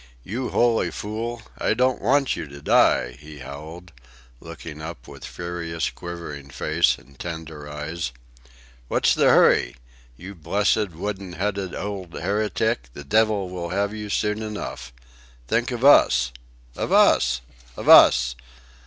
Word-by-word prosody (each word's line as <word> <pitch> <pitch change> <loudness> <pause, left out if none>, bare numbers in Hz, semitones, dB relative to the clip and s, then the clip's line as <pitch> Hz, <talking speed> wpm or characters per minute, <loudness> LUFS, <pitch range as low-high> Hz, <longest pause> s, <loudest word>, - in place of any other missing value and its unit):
"You 120 +5 -4
holy 120 -1 +2
fool! 115 +2 -5 0.2
I - - +1
don't 125 +1 +1
want 135 +5 +2
you 80 - -6
to 70 0 -11
die," 60 -3 +3
he 75 0 -12
howled, 80 +6 -10 0.5
looking 80 -1 -9
up 80 -6 -8
with - - -12
furious, 85 -1 -4
quivering 85 -5 -8
face 80 +5 +1
and 70 -2 -20
tender 80 -3 -7
eyes. 75 0 -4 0.8
"What's - - +2
the - - +3
hurry? - - +4 0.4
You 95 +6 -9
blessed 100 +4 0
wooden 95 +2 -5
headed 95 0 -3
ould 95 -4 -6
heretic, 100 - -1
the 75 - -8
divvle 105 +3 +1
will 85 -2 -5
have 100 +3 -1
you 105 -1 -6
soon 105 +1 -1
enough. 105 - -6 0.6
Think 120 - 0
of 125 +1 -2
Us... 65 - +6 0.4
of - - -3
Us... 60 -1 +4 0.4
of - - -6
Us!" 60 0 +7
85 Hz, 135 wpm, -23 LUFS, 75-105 Hz, 0.8 s, Us